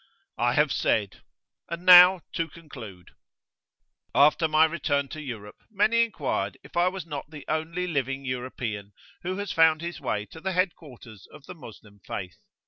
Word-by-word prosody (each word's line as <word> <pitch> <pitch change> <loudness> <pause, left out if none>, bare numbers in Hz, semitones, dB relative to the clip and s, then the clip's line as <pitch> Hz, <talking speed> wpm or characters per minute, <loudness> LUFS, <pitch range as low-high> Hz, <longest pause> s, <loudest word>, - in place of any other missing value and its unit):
I - - +2
have - - +3
said. 105 -3 0 0.5
And 170 +2 -6
now 180 0 +9
to 165 -2 -1
conclude. 110 - -12 1.0
After 150 +3 +5
my 155 +1 +5
return 145 -4 -1
to 155 - -7
Europe, 110 -7 -8
many 220 +2 +3
inquired 140 - -3
if - - -16
I 175 +1 +3
was 185 -2 -4
not 145 -3 -7
the 150 -2 -11
only 160 +3 -2
living 135 -5 -2
European 120 -5 -5 0.3
who 185 +2 -4
has 205 -1 -4
found 160 -1 +4
his 170 0 -6
way 105 0 -2
to 160 - -11
the 190 +1 -2
Head 185 0 +1
Quarters 120 - -14
of 150 -2 -14
the - - -9
Moslem 110 - -14
Faith. 90 -3 -6
155 Hz, 165 wpm, -26 LUFS, 125-175 Hz, 1.0 s, now